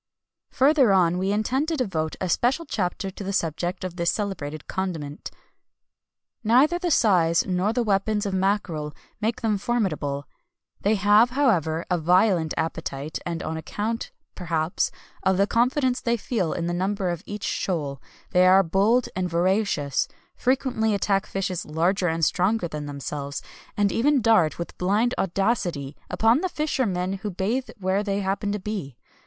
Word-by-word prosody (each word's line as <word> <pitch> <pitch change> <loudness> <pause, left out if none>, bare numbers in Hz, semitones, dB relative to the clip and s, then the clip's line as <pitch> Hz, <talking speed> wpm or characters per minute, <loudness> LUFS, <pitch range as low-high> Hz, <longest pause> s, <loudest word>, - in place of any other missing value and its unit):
Further 270 -4 +4
on, 180 -2 +3
we 190 +1 0
intend 255 +8 0
to 325 -1 -1
devote 165 - -1
a 185 - -1
special 255 - +1
chapter 190 -4 -2
to 200 - -8
the 195 - -3
subject 175 0 -2
of 180 -1 -5
this 170 -1 +1
celebrated 155 -8 -3
condiment. 165 -6 -4 1.1
"Neither 265 +10 +4
the 355 -1 -1
size 175 - +3
nor 185 +3 0
the 240 +1 0
weapons 210 0 +1
of 200 - -2
mackerel 185 -6 -1 0.3
make 220 +2 -1
them 215 -3 +1
formidable; 155 -12 -1 0.5
they 210 +2 +2
have, 210 +3 +5
however, 180 - +1
a 180 - +2
violent 175 0 +3
appetite, 160 -2 -3
and 170 -1 -3
on 160 - -3
account, 215 +8 -3 0.2
perhaps, 165 -2 -1 0.3
of 190 -1 +2
the 200 - +4
confidence 250 +3 +1
they 235 0 +1
feel 205 -7 -1
in 170 - -2
the 175 - -1
number 190 +1 -1
of 170 -2 -4
each 205 0 -6
shoal, 145 -7 -2 0.3
they 180 0 +5
are 190 +1 +6
bold 205 +8 +2
and 185 -1 -1
voracious, 175 -5 +1 0.3
frequently 245 -4 +1
attack 200 0 0
fishes 185 -2 -2
larger 175 +5 0
and 165 -1 +1
stronger 190 +2 +1
than 150 -2 -6
themselves, 140 0 -5 0.3
and 205 -1 +2
even 280 +4 +3
dart 215 -9 +3
with 170 - -6
blind 210 +7 +2
audacity 180 - -1
upon 225 +6 +3
the 370 - -1
fishermen 195 - -1
who 210 0 -4
bathe 210 +8 -2
where 190 0 0
they 200 -1 -1
happen 200 +1 -1
to 210 - -1
be. 185 - -5
195 Hz, 160 wpm, -25 LUFS, 170-220 Hz, 1.1 s, are